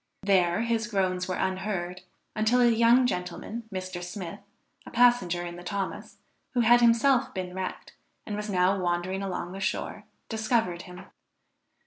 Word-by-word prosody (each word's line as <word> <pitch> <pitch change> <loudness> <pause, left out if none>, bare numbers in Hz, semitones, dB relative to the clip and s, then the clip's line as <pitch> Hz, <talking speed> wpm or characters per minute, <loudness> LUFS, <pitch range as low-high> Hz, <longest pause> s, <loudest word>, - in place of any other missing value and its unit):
There 185 -1 +3
his 230 0 0
groans 185 -4 0
were 185 - -2
unheard 185 -1 -2 0.3
until 220 +3 +3
a 245 - +6
young 235 +2 +5
gentleman, 195 +3 -4
Mr. 185 -1 -5
Smith, 180 +1 -6 0.4
a - - -11
passenger 225 -8 +3
in 175 0 -7
the 175 - -10
Thomas, 195 +1 -4 0.4
who 245 - +4
had 240 +1 +6
himself 240 +2 +4
been 180 -1 -4
wrecked, 185 0 -5 0.3
and 210 - -4
was 210 0 -4
now 190 0 +2
wandering 180 +2 -1
along 180 -2 -4
the 190 - -7
shore, 190 - -3 0.2
discovered 220 -5 0
him. 180 +1 -11
190 Hz, 150 wpm, -27 LUFS, 180-230 Hz, 0.4 s, a